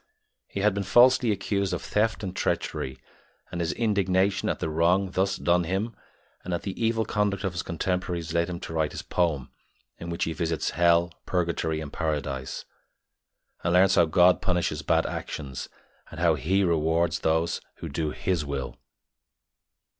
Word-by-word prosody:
He 100 - -4
had 105 0 +3
been 100 - -2
falsely 120 +4 +5
accused 100 -1 -1
of - - -5
theft 110 +1 0
and 95 -2 -4
treachery, 65 0 -2 0.5
and 85 - -3
his 85 +1 0
indignation 100 -3 +1
at - - 0
the - - -2
wrong 85 +4 +2
thus 95 +1 0
done 85 +1 +2
him 95 +7 -2 0.5
and 90 -1 -2
at - - -5
the 95 - -3
evil 115 0 +1
conduct 105 -2 0
of 95 -3 -1
his 90 - -2
contemporaries 85 -1 -2
led 85 +1 +1
him 85 -1 -4
to - - -6
write 80 -2 0
his - - -6
poem, 80 -7 -1 0.5
in 85 - -6
which 85 - -2
he 80 - -1
visits 80 -1 -1
Hell, 85 0 +3
Purgatory, 85 -3 0
and 75 -2 -7
Paradise, 70 -5 -3 1.0
and 85 - +1
learns 95 +1 +5
how 85 - +5
God 90 +3 +4
punishes 85 -5 0
bad 75 - +2
actions, 70 -4 -5 0.4
and 80 - -9
how 85 -1 +4
He 90 +8 +1
rewards 85 0 +1
those 80 +1 +1
who - - -7
do 75 +2 -2
His 85 +1 -1
will. 70 -2 -4
85 Hz, 170 wpm, -26 LUFS, 80-95 Hz, 1.0 s, falsely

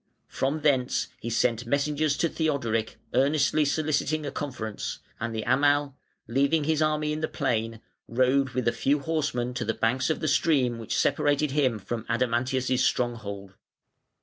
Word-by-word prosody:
From 140 +4 -1
thence 135 -4 +1
he 115 - -5
sent 115 0 0
messengers 145 +2 +1
to 170 - +2
Theodoric 130 -10 -1 0.2
earnestly 145 +4 +3
soliciting 155 +1 0
a 140 - -3
conference; 120 -7 -4 0.2
and 115 0 -3
the 110 - -2
Amal, 145 +3 +2 0.3
leaving 140 +6 +2
his 155 +1 +1
army 150 0 +1
in 155 - -3
the 155 - 0
plain, 115 -6 -2 0.3
rode 130 +1 +2
with 125 -2 0
a - - +5
few 135 +5 +1
horsemen 140 -6 -1
to 125 -1 -3
the 110 - -1
banks 130 +4 +1
of 160 - 0
the 155 - -2
stream 135 -5 +2
which 115 - -3
separated 145 0 +2
him 135 -5 +2
from 110 +3 -5
Adamantius' 125 +2 0
stronghold. 100 -7 -2
130 Hz, 155 wpm, -27 LUFS, 120-150 Hz, 0.3 s, a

